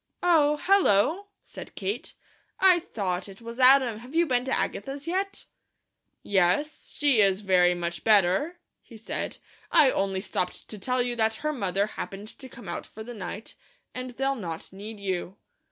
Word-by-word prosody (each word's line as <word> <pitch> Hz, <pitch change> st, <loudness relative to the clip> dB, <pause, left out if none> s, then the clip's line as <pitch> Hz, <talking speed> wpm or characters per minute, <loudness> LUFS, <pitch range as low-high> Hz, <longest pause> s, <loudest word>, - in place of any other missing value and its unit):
"Oh! 300 Hz, -4 st, +4 dB
Hello!" 375 Hz, -, +3 dB, 0.2 s
said -, -, -11 dB
Kate. 410 Hz, -, -4 dB, 0.4 s
"I 370 Hz, -2 st, +6 dB
thought 195 Hz, -, -3 dB
it 195 Hz, -, -12 dB
was 230 Hz, +1 st, -9 dB
Adam. 255 Hz, -4 st, +5 dB
Have 250 Hz, +6 st, -11 dB
you 340 Hz, +1 st, +4 dB
been 250 Hz, -4 st, +1 dB
to 265 Hz, -, -3 dB
Agatha's 275 Hz, +6 st, -3 dB
yet?" 385 Hz, +3 st, -2 dB, 0.8 s
"Yes. 200 Hz, +11 st, 0 dB
She 280 Hz, -7 st, +4 dB
is 195 Hz, 0 st, +3 dB
very 180 Hz, -3 st, +4 dB
much 170 Hz, -1 st, -4 dB
better," 210 Hz, -, +3 dB, 0.2 s
he 230 Hz, -, -14 dB
said. 220 Hz, -, -4 dB, 0.3 s
"I 300 Hz, -6 st, +6 dB
only 195 Hz, -1 st, 0 dB
stopped 185 Hz, -2 st, -3 dB
to 215 Hz, -, -6 dB
tell 250 Hz, +4 st, 0 dB
you 245 Hz, 0 st, -2 dB
that 220 Hz, 0 st, +2 dB
her 305 Hz, -, +1 dB
mother 200 Hz, -6 st, 0 dB
happened 205 Hz, -1 st, -7 dB
to 260 Hz, -, -9 dB
come 235 Hz, -5 st, -12 dB
out 175 Hz, -, -5 dB
for 220 Hz, -, -10 dB
the 240 Hz, +2 st, -8 dB
night, 210 Hz, 0 st, -7 dB, 0.4 s
and 255 Hz, 0 st, -5 dB
they'll 270 Hz, +3 st, -1 dB
not 175 Hz, -9 st, -7 dB
need 210 Hz, +2 st, -8 dB
you." 190 Hz, -1 st, -3 dB
225 Hz, 170 wpm, -27 LUFS, 195-275 Hz, 0.8 s, I